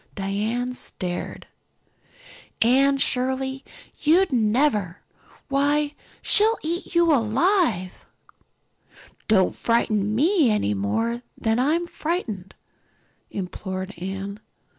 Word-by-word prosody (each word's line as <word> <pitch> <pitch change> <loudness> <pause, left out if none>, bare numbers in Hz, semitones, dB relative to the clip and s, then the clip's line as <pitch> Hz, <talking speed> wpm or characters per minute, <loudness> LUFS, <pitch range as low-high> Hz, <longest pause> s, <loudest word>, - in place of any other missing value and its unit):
Diana 215 +6 -2
stared. 180 -7 -5 1.1
"Anne 275 +4 +4
Shirley, 265 +1 -1 0.4
you'd 340 +4 +3
never! 215 - +1 0.4
why 290 +2 +1 0.3
she'll 445 +2 +4
eat 340 +2 -4
you 340 -2 +5
alive!" 235 - +1 1.2
"Don't 190 -4 +3
frighten 215 -3 +1
me 315 - +3
any 210 - +1
more 225 - -1 0.2
than 225 +1 0
I 285 +5 +3
am 345 +1 -1
frightened," 300 - -4 0.7
implored 190 0 -5
Anne. 195 +2 -5
240 Hz, 90 wpm, -24 LUFS, 200-295 Hz, 1.2 s, you